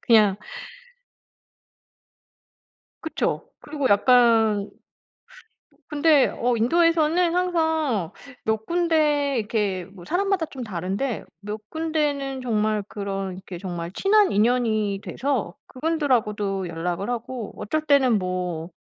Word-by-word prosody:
그냥 210 Hz, -4 st, +5 dB, 2.7 s
그쵸. 320 Hz, -, -2 dB
그리고 290 Hz, -3 st, -2 dB
약간 220 Hz, -2 st, +4 dB, 1.2 s
근데 300 Hz, -1 st, +4 dB
어 245 Hz, +1 st, +1 dB
인도에서는 330 Hz, +6 st, +3 dB
항상 320 Hz, -, 0 dB, 0.3 s
몇 220 Hz, 0 st, -1 dB
군데 305 Hz, -5 st, +2 dB
이렇게 205 Hz, -4 st, -1 dB
뭐 185 Hz, -1 st, -14 dB
사람마다 380 Hz, -, 0 dB
좀 265 Hz, -4 st, -8 dB
다른데 200 Hz, +5 st, -3 dB, 0.2 s
몇 210 Hz, +1 st, -7 dB
군데는 295 Hz, -4 st, -1 dB
정말 215 Hz, -3 st, 0 dB
그런 195 Hz, -2 st, -4 dB
이렇게 185 Hz, -1 st, -9 dB
정말 175 Hz, -2 st, -5 dB
친한 410 Hz, 0 st, +3 dB
인연이 215 Hz, -2 st, +1 dB
돼서 255 Hz, -10 st, -2 dB
그분들하고도 230 Hz, -, -1 dB
연락을 175 Hz, +5 st, -3 dB
하고 240 Hz, -1 st, -4 dB
어쩔 310 Hz, +9 st, -2 dB
때는 260 Hz, -6 st, +4 dB
뭐 180 Hz, -3 st, -3 dB
235 Hz, 225 characters per minute, -24 LUFS, 200-300 Hz, 2.7 s, 그냥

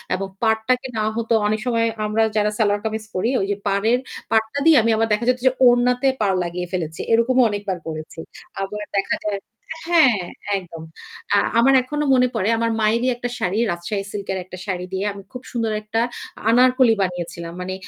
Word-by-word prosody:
এবং 195 Hz, +1 st, -3 dB, 0.2 s
পাড়টাকে 225 Hz, +4 st, +1 dB
না 215 Hz, -, 0 dB
হতো 230 Hz, 0 st, -1 dB
অনেক 215 Hz, +1 st, 0 dB
সময় 230 Hz, -2 st, +1 dB, 0.2 s
আমরা 215 Hz, +1 st, +1 dB
যারা 210 Hz, 0 st, +2 dB
সেলোয়ার 205 Hz, -2 st, +1 dB
কামিজ 220 Hz, 0 st, -2 dB
করি 205 Hz, +6 st, 0 dB
ওই 195 Hz, -, 0 dB
যে -, -, 0 dB
পাড়ের 215 Hz, +5 st, +2 dB, 0.3 s
পাড়টা 220 Hz, +5 st, +1 dB
দিয়ে 325 Hz, -2 st, +7 dB
আমি 230 Hz, -, +2 dB
আবার 225 Hz, +1 st, +1 dB
দেখা 210 Hz, +3 st, 0 dB
যেত 250 Hz, -, +3 dB
যে 260 Hz, -, +6 dB, 0.2 s
ওড়নাতে 245 Hz, +2 st, +3 dB
পাড় 195 Hz, -2 st, +2 dB
লাগিয়ে 175 Hz, +1 st, -4 dB
ফেলেছি। 165 Hz, -3 st, -3 dB
এরকমও 250 Hz, +3 st, +4 dB
অনেকবার 205 Hz, -2 st, -3 dB
করেছি। 155 Hz, +1 st, -7 dB, 0.4 s
আবার 210 Hz, +2 st, -4 dB
দেখা 195 Hz, -, +1 dB
যায় 205 Hz, -2 st, -1 dB, 0.5 s
হ্যাঁ, 265 Hz, -, +5 dB, 0.4 s
একদম। 165 Hz, -3 st, -9 dB, 0.5 s
আ -, -, +5 dB, 0.2 s
আমার 270 Hz, +3 st, +5 dB
এখনো 295 Hz, +3 st, -2 dB
মনে 250 Hz, -1 st, +4 dB
পড়ে 190 Hz, -, 0 dB
আমার 230 Hz, 0 st, 0 dB
মায়েরই 230 Hz, +4 st, +2 dB
একটা 245 Hz, 0 st, -4 dB
শাড়ি 190 Hz, +5 st, -1 dB
রাজশাহী 195 Hz, +4 st, -4 dB
সিল্ক 200 Hz, -1 st, -6 dB
এর 190 Hz, -, -3 dB
একটা 185 Hz, -, -10 dB
শাড়ি 180 Hz, -2 st, -3 dB
দিয়ে 190 Hz, +2 st, -1 dB
আমি 200 Hz, -, -10 dB
খুব 250 Hz, -, -8 dB
সুন্দর 230 Hz, -3 st, -1 dB
একটা 215 Hz, +2 st, -1 dB, 0.5 s
আনারকলি 250 Hz, 0 st, +5 dB
বানিয়েছিলাম। 170 Hz, -2 st, -4 dB
মানে 185 Hz, +1 st, -4 dB
215 Hz, 185 wpm, -21 LUFS, 195-240 Hz, 0.5 s, দিয়ে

